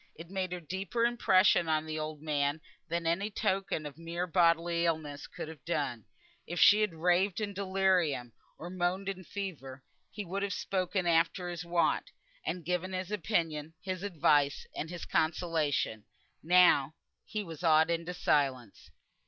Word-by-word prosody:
It 165 +3 -11
made 190 -2 -2
a 180 - -3
deeper 190 +7 -2
impression 185 -7 +4
on 155 0 +1
the 155 0 -4
old 155 -1 -5
man 145 -1 0 0.3
than 170 0 -2
any 180 +6 0
token 190 -6 -1
of 150 +1 -8
mere 170 +2 -3
bodily 170 -1 +2
illness 150 -3 -3
could - - -7
have 160 -4 -11
done. 140 - -2 0.4
If 175 - -3
she 210 +1 +7
had 210 -6 0
raved 180 +4 +2
in 205 -2 -3
delirium, 185 - +1 0.2
or 175 +2 -7
moaned 185 +2 -1
in 190 -1 -5
fever, 155 -10 -6 0.3
he 210 -1 -6
could 195 +3 -3
have 200 -1 -1
spoken 185 -1 -1
after 170 +2 +2
his 175 0 -5
wont, 170 -1 +1 0.3
and 180 -3 -4
given 180 +2 -1
his 185 +1 -4
opinion, 165 -7 -1
his 185 -1 -4
advice, 150 -7 +2
and 160 - -4
his 175 -1 -6
consolation; 155 -9 0 0.4
now 165 -4 +5 0.3
he 210 -1 -4
was 165 -2 -9
awed 160 0 +5
into 170 +2 -2
silence. 130 - 0
170 Hz, 160 wpm, -31 LUFS, 155-185 Hz, 0.4 s, she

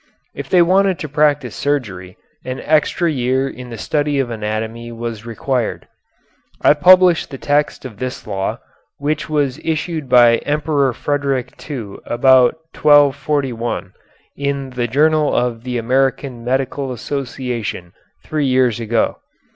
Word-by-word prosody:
If - - -7
they 180 -2 +5
wanted 190 +1 +3
to 170 -4 -5
practise 145 -3 +1
surgery, 100 -11 -3 0.3
an 130 +1 -5
extra 155 +2 +1
year 130 0 0
in 125 -2 -9
the 115 - -7
study 145 +4 -1
of 130 -3 -1
anatomy 110 +2 -4
was 115 -1 -6
required. 120 +1 -2 0.7
I - - +5
published 180 +2 +5
the 135 - -7
text 145 0 0
of 110 -5 -9
this 130 0 -5
law, 95 -2 -3 0.4
which 150 +2 -2
was 145 -2 0
issued 160 -2 -2
by 120 -2 +6
the - - -12
Emperor 145 -2 +1
Frederick 140 -2 -1 0.2
II 115 -9 -6
about 125 +1 +4 0.2
1241, 140 -4 +2 0.4
in 140 -1 -3
the 120 -1 -2
Journal 150 +4 +2
of 120 -2 -1
the 125 -1 -3
American 130 +1 0
Medical 135 +2 -1
Association 125 -8 -4 0.3
three 150 -3 -1
years 130 -3 +2
ago. 115 0 0
130 Hz, 135 wpm, -18 LUFS, 120-145 Hz, 0.7 s, by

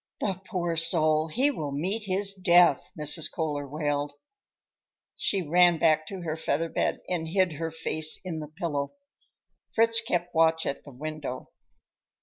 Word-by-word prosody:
"The 190 -2 -2
poor 175 -5 -2
soul, 155 -1 +3
he 260 - +2
will 150 - -4
meet 190 +10 -2
his 195 +1 +1
death!" 175 -6 +4
Mrs. 150 +2 -1
Kohler 145 -3 -3
wailed. 145 0 -2 1.0
She 195 -2 0
ran 175 +1 +5
back 155 -1 +3
to 195 -2 -6
her 160 -2 -2
feather 160 0 -1
bed - - -1
and 170 -3 -2
hid 185 0 +1
her 160 +2 -3
face 155 -1 -1
in 165 -3 -4
the 150 - -6
pillow. 155 -3 -3 0.8
Fritz 230 0 +5
kept 175 -5 -2
watch 160 0 +3
at 140 - -4
the 145 - -11
window. 145 -1 -6
165 Hz, 150 wpm, -27 LUFS, 155-180 Hz, 1.0 s, ran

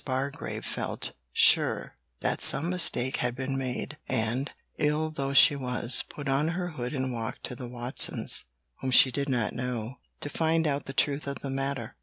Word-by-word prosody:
Bargrave 135 +1 -4
felt - - -2 0.2
sure - - +4 0.3
that - - -1
some 165 +5 +5
mistake 140 -8 +3
had 125 -1 -2
been 135 +1 -4
made, 135 +3 -5
and, 115 +5 -1 0.3
ill 150 +1 0
though 140 -3 -3
she 145 - +8
was, 125 -2 0
put 145 -1 -8
on 135 +3 +1
her 175 +2 -3
hood 125 -6 -5
and 130 -1 -2
walked 115 -1 -6
to 125 - -5
the 125 0 -8
Watsons' 120 +1 +2 0.3
(whom 130 - -3
she 130 +1 +6
did 140 +2 -3
not 120 -5 -1
know) 125 0 -5 0.2
to - - -3
find 160 +2 0
out 145 -2 -2
the 135 - -5
truth 140 +1 0
of 140 - -4
the 135 - -4
matter. 135 -3 -4
135 Hz, 180 wpm, -27 LUFS, 125-145 Hz, 0.3 s, she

